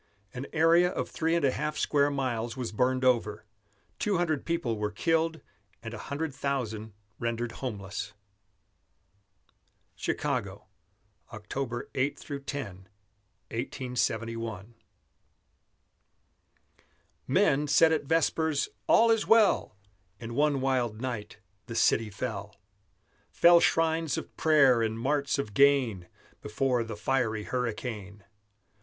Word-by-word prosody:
An 125 +2 -6
area 165 +2 +4
of - - -3
three 165 +1 0
and 170 - +2
a 135 - +3
half 150 +3 -3
square 145 -1 +2
miles 125 -4 -2
was 120 -4 -3
burned 130 +3 +1
over; 110 -4 +1 0.5
two 205 -3 +1
hundred 160 -5 -1
people 165 -9 -1
were 105 -1 -2
killed 165 +5 0 0.4
and 115 0 -6
a 110 - -7
hundred 145 +4 -4
thousand 115 -6 -3 0.3
rendered 115 0 -2
homeless. 100 -5 -5 1.8
CHICAGO - - -2 0.7
[October 120 +3 -5
8 135 +2 0
10, 145 - -6 1.1
1871] 115 -4 -3 2.5
Men 145 +2 +3
said 155 +3 +5
at 155 -2 0
vespers: 160 -1 +1 0.2
"All 230 0 +5
is 225 -1 +1
well!" 225 - +4 0.4
In 115 0 -7
one 145 +1 +2
wild 125 -5 0
night 120 -4 -5 0.3
the 115 - -6
city 115 -1 +3
fell; 105 -1 -5 0.7
Fell 170 0 +6
shrines 165 -2 +1
of - - -7
prayer 140 -6 +4
and 110 0 -1
marts 140 +3 0
of 105 -7 -4
gain 125 -8 +3 0.3
Before 125 +3 0
the 110 -2 -7
fiery 110 -3 0
hurricane. 105 -4 -4
130 Hz, 110 wpm, -28 LUFS, 115-150 Hz, 2.5 s, Fell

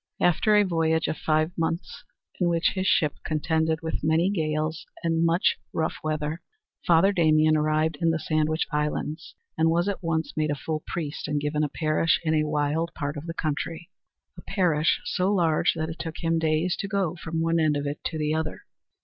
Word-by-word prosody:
After 195 +5 +3
a 210 - +6
voyage 160 -3 +1
of - - -1
five 155 +2 +1
months, 165 +1 -3 0.4
in 175 - +2
which 170 0 +2
his 190 -1 -1
ship 150 -5 +2
contended 160 +1 0
with 160 - -3
many 160 +5 +2
gales 155 -3 -2 0.2
and 165 0 +1
much 170 +2 +2 0.2
rough 160 0 -1
weather, 155 +1 -2 0.5
Father 170 +3 +5
Damien 155 -4 +4
arrived 155 0 +1
in 165 - +3
the 165 - +1
Sandwich 155 0 0
Islands 150 +1 -3 0.2
and 160 0 +4
was 170 +3 +2
at 200 - -2
once 165 -2 -2
made 155 0 0
a 145 - 0
full 155 +2 -3
priest 155 -3 -4
and 150 0 0
given 150 +1 -1
a 150 - 0
parish 155 +2 +1
in 160 -1 +1
a 155 -1 +2
wild 150 +2 0
part 145 -1 -3
of 150 +3 -7
the 165 - -5
country 165 +3 -3 0.4
a 175 - -11
parish 170 -6 +1
so 185 +1 0
large 170 -6 +2
that 160 0 -2
it 165 - -9
took 165 -1 -5
him 165 0 +2
days 160 +3 +1
to 200 - -3
go 195 -4 -1
from 160 0 -3
one 165 0 +1
end 155 -2 +2
of 145 - -3
it 145 +1 -4
to 160 - -2
the 150 0 0
other. 160 -1 -3
160 Hz, 200 wpm, -26 LUFS, 155-165 Hz, 0.5 s, a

